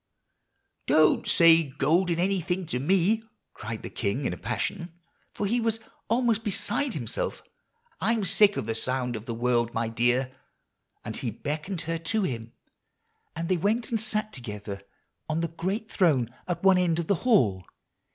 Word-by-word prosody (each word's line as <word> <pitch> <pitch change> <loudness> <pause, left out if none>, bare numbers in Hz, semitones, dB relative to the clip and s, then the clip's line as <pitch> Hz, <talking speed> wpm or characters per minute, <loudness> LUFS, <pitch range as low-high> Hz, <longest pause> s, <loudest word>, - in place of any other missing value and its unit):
"'Don't 155 -1 +4
say 165 -1 +7
golden 160 +5 +1
anything 180 0 0
to 155 -6 -2
me,' 190 - +2 0.3
cried 110 0 -6
the - - -5
king 115 +6 -2
in - - 0
a - - -6
passion, 170 - -3 0.4
for 205 - -3
he 235 +4 +1
was 225 -1 0 0.3
almost 230 -1 +2
beside 235 +5 -1
himself. - - -4 0.6
'I'm 225 -2 +1
sick 200 +2 +4
of - - -2
the 115 - -1
sound 125 +1 -1
of 110 +3 -7
the 115 - -2
word, 120 0 +1
my 115 0 0
dear;' 120 +3 +1 0.7
and 110 - -5
he 130 - -3
beckoned 155 - -4
her 165 0 -3
to 210 +6 -1
him, 115 -7 -4 0.8
and 165 +1 -3
they 185 - +2
went 220 +8 0
and 225 -2 0
sat 215 0 -2
together 105 -5 -7 0.5
on 155 +1 0
the 170 - -1
great 195 +7 -3
throne 135 - +2
at 175 -1 -3
one 190 -1 +6
end 170 -3 +2
of 170 - -1
the 200 - +2
hall. 120 - +3
165 Hz, 165 wpm, -27 LUFS, 125-200 Hz, 0.8 s, say